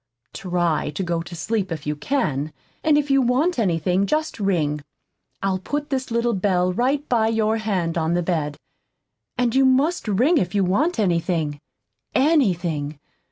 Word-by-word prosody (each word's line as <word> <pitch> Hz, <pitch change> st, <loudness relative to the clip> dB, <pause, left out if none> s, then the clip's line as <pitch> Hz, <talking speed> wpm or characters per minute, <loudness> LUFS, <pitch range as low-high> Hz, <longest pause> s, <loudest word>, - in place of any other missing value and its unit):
TRY 175 Hz, -5 st, -1 dB
to 190 Hz, -, -2 dB
go 170 Hz, -1 st, -1 dB
to 175 Hz, +1 st, -9 dB
sleep 195 Hz, +2 st, -2 dB
if 155 Hz, -2 st, -5 dB
you 150 Hz, 0 st, -1 dB
can. 150 Hz, -, -1 dB, 0.3 s
And 305 Hz, -2 st, +4 dB
if 290 Hz, -1 st, 0 dB
you 275 Hz, 0 st, +5 dB
want 260 Hz, +7 st, +1 dB
anything, 180 Hz, 0 st, +1 dB
just 310 Hz, -2 st, -1 dB
ring. 160 Hz, -7 st, 0 dB, 0.6 s
I'll 190 Hz, -1 st, 0 dB
put 290 Hz, +10 st, -4 dB
this 260 Hz, -1 st, -1 dB
little 235 Hz, 0 st, +1 dB
bell 185 Hz, -2 st, +1 dB
right 275 Hz, +7 st, 0 dB
by 225 Hz, -3 st, +2 dB
your 220 Hz, 0 st, +1 dB
hand 185 Hz, -7 st, -1 dB
on 160 Hz, +1 st, 0 dB
the 175 Hz, -, +1 dB
bed; 155 Hz, -4 st, -1 dB, 0.8 s
and 245 Hz, -2 st, +1 dB
you 270 Hz, +1 st, +4 dB
must 270 Hz, +4 st, +2 dB
ring 255 Hz, -, +3 dB
if 180 Hz, +2 st, -2 dB
you 200 Hz, -, +3 dB
want 275 Hz, -, +1 dB
anything, 170 Hz, -6 st, 0 dB, 0.6 s
ANYTHING. 175 Hz, -, +1 dB
195 Hz, 160 wpm, -22 LUFS, 170-255 Hz, 0.8 s, you